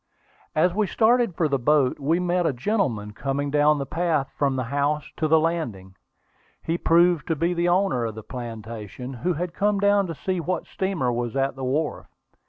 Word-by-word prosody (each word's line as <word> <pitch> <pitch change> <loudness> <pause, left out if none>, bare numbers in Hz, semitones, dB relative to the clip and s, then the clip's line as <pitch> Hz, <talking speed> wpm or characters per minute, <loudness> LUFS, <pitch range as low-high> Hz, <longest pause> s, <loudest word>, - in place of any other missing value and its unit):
As 170 +3 +3
we 210 +1 +1
started 230 -2 +2
for 160 - +1
the 140 -2 0
boat, 140 +1 +2
we 155 +5 +1
met 180 -1 +1
a - - 0
gentleman 120 - -1
coming 140 +4 -2
down 150 +1 +4
the 140 - -3
path 160 -2 -1
from 140 -2 +1
the 130 - -1
house 145 +1 0
to 155 - +1
the 160 +1 +5
landing. 120 - -2 0.7
He 165 - -1
proved 170 -1 +3
to 165 - +1
be 170 +4 0
the 175 0 +1
owner 175 -10 +2
of 110 -2 -4
the 110 - -8
plantation, 115 +1 -7
who 180 - +1
had 170 +2 -4
come 205 +1 +1
down 200 -1 +3
to 165 - -5
see 185 +4 -2
what 180 +3 -2
steamer 190 -10 -1
was 120 +1 -3
at 135 0 0
the 135 - -7
wharf. 145 +4 -1
155 Hz, 195 wpm, -24 LUFS, 130-175 Hz, 0.7 s, the